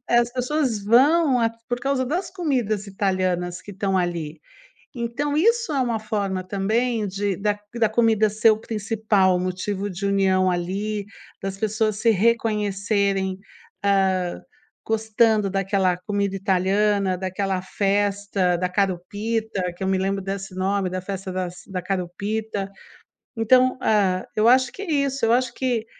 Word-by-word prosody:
É, 240 - +4
as 240 0 +1
pessoas 255 -3 -1
vão 270 +4 +4
a 230 -1 +2 0.2
por 245 0 -1
causa 270 0 0
das 355 +6 -2
comidas 245 - -1
italianas 185 -3 -1
que 205 - -11
estão 195 0 0
ali. 165 -3 -3 0.5
Então, 255 +4 -2
isso 460 +5 +2
é 280 - 0
uma 235 -3 0
forma 200 -3 -2
também 215 +4 0
de 200 0 -2
da 205 0 0 0.2
da 225 -2 +3
comida 220 -1 +3
ser 215 +2 +4
o 215 - 0
principal 210 -4 +1
motivo 185 +2 -3
de 190 +1 -5
união 190 -2 +2
ali, 200 +4 -2 0.4
das 195 0 -4
pessoas 215 0 0
se 230 +2 +2
reconhecerem, 200 -3 +1 0.4
ah, 190 -3 +1 0.5
gostando 220 -1 +2
daquela 195 -2 +1
comida 200 +1 -2
italiana, 195 0 +1
daquela 190 0 -2
Festa 200 -1 0
da 180 - -1
Achiropita, 200 +2 -2
que 185 - -6
eu 190 - 0
me 190 - +2
lembro 195 +1 0
desse 195 -1 -5
nome, 190 0 0
da 185 +1 -3
Festa 190 0 -5
das 180 -1 -4
da 190 -2 -4
Achiropita. 200 +3 -3 0.7
Então, 255 +3 +4
ah, 190 -4 +2
eu 215 +1 +3
acho 255 0 +5
que - - -8
é 355 - -4
isso, 270 -3 -1
eu 225 - +3
acho 245 -1 +1
que 245 -3 -1
205 Hz, 150 wpm, -23 LUFS, 190-225 Hz, 0.7 s, acho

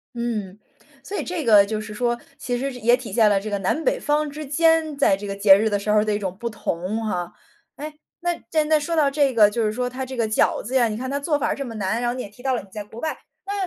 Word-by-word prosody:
嗯。 215 -5 -3 0.4
所 405 +8 -6
以 - - -2
这 345 -5 -3
个 210 -3 +7
就 215 +1 -3
是 215 0 -8
说， 240 +1 -1 0.2
其 245 -1 -3
实 275 +2 -2
是 250 - -9
也 240 +2 +4
体 245 -5 -9
现 215 -1 +4
了 195 - +3
这 215 - -6
个 200 -1 -1
南 195 - -1
北 - - +2
方 295 +1 0
之 300 +2 -7
间 320 +1 +2
在 195 -9 +4
这 205 +1 -7
个 195 - -4
节 200 -1 +7
日 220 0 +1
的 205 - +1
时 205 +1 -3
候 210 - +4
儿 - - 0
的 215 -1 0
一 - - 0
种 190 -3 -4
不 235 +3 -4
同 210 +1 -3
哈。 175 -4 -3 0.4
哎， 300 +1 -7 0.3
那， 350 0 0
既 320 - -5
然 300 - +2
那 310 -1 +4
说 330 +3 -3
到 295 -3 +3
这 280 -2 +2
个， 215 -4 +6
就 225 +2 -1
是 210 - 0
说 245 +2 -2
它 260 +1 -5
这 260 0 -8
个 225 -2 0
饺 215 - +1
子 250 +5 -6
呀， 240 -3 +4
你 215 - -4
看 260 +1 -4
它 280 - -1
做 290 +1 0
法 - - 0
儿 - - 0
这 275 - -5
么 230 -3 -7
难， 215 +4 -1
然 240 - +1
后 - - -3
你 255 - -5
也 - - -8
提 210 +5 -17
到 265 -1 +1
了 240 - -1
你 195 - -15
在 210 0 -6
国 220 +3 -11
外， 315 - -2 0.3
那 400 - -3
235 Hz, 335 characters per minute, -23 LUFS, 210-280 Hz, 0.4 s, 个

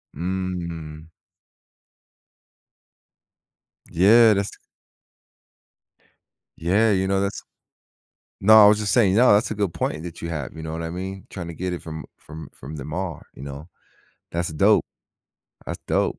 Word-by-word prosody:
Mm. 85 -3 -5 2.8
Yeah, 110 +6 +6
that's 100 0 -1
t - - -15 2.0
Yeah, 100 +7 +2
you 95 -1 +1
know, 95 0 +1
that's 100 0 -3 1.0
No, 110 +2 +8
I - - +9
was 105 0 +4
just 105 -2 -1
saying 100 -6 +4
No, 125 -2 +6
that's 110 +3 +2
a - - -2
good 100 -5 -1
point 75 +1 -3
that 85 -1 -8
you 85 - -4
have, 75 -5 -5
you 80 - -8
know 80 - -5
what 85 0 -4
I 80 - -4
mean? 95 +2 -6
Tryna 85 -3 -7
get 90 0 -3
it 85 - -5
from 80 -1 -8
from 80 -1 -11
from 75 +5 -10
the 70 -2 -7
mar, 85 0 -5
you - - -12
know? 70 +3 -8 0.6
That's 85 0 -2
dope. 100 +7 +3 0.8
That's - - -5
dope. - - 0
90 Hz, 150 wpm, -23 LUFS, 80-100 Hz, 2.8 s, I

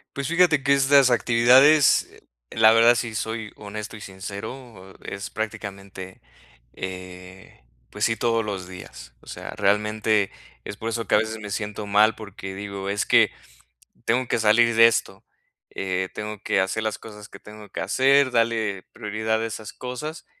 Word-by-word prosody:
Pues 140 -1 -3
fíjate 170 -4 +3
que 140 +1 +3
estas 140 -1 +5
actividades, 125 +5 +5 0.4
la 110 0 +5
verdad 115 +1 +6
sí 115 -2 -3
soy 110 -1 -4
honesto 105 +1 -8
y 105 - -11
sincero, 100 +2 -9
e - - -5
es 100 +1 -7
prácticamente, 100 -3 -7 0.5
eh, 90 -2 -9 0.3
pues 105 - -6
sí, 115 0 0
todos 115 -1 +1
los 100 -4 -5
días. 65 -9 -11
O - - -22
sea, - - -8
realmente 105 0 +1 0.4
es - - -6
por 110 +2 -5
eso 115 0 -3
que - - +3
a - - +6
veces 110 0 -3
me 105 -1 -8
siento 105 0 -4
mal 105 +2 +4
porque 95 -2 -9
digo: 100 -1 -6
"Es 100 +1 -1
que, - - +4 0.7
tengo 125 +1 0
que - - 0
salir 115 +2 +3
de 115 0 +9
esto". 115 - -1 0.5
Eh, 95 -1 -3
tengo 105 -1 -6
que 95 - +1
hacer 95 +4 -1
las 110 -1 -2
cosas 105 -2 -12
que - - -14
tengo 105 0 -13
que - - -5
hacer, 135 0 +3
darle 115 -5 0
prioridad 110 0 -2
a - - -1
esas 110 -1 -7
cosas 130 +6 -7
110 Hz, 170 wpm, -23 LUFS, 100-115 Hz, 0.7 s, de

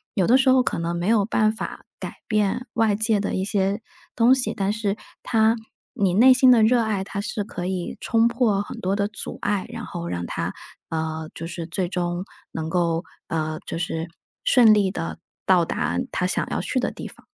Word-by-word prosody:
有 190 -5 +2
的 250 +3 +6
时 265 0 +3
候 260 0 +6
可 - - -1
能 170 +1 -2
没 175 - -2
有 215 -2 +4
办 215 0 +2
法 - - -6
改 - - -7
变 215 +2 +1
外 225 -2 +2
界 215 0 +1
的 200 - -2
一 190 - -1
些， 200 0 0 0.4
东 245 +3 +6
西， 260 - 0
但 200 +1 0
是 215 -1 -1 0.3
它 220 -1 +3 0.4
你 195 -3 +1
内 250 +7 +7
心 255 0 +6
的 235 -3 +6
热 235 +2 +4
爱， 210 -4 -1
它 200 0 -4
是 205 0 -3
可 180 -3 -5
以 185 -1 -3
冲 230 0 +3
破 225 -5 +1
很 - - -8
多 195 +2 0
的 200 - +1
阻 210 - -5
碍， 205 -2 0
然 235 0 -6
后 170 -2 -5
让 85 0 -3
它， - - -3 0.4
呃， 160 0 -3
就 165 - -6
是 170 0 -5
最 180 +1 -1
终 175 0 -2 0.3
能 160 0 -4
够， 170 0 0 0.2
呃， 155 -1 -2
就 - - -4
是 165 0 -3 0.3
顺 230 -4 +6
利 200 -3 +2
地 165 -3 -4 0.3
到 185 -2 +5
达 85 - -1
它 - - 0
想 - - 0
要 - - -1
去 - - -1
的 - - -1
地 - - -7
方。 - - -15
200 Hz, 225 characters per minute, -23 LUFS, 175-220 Hz, 0.4 s, 内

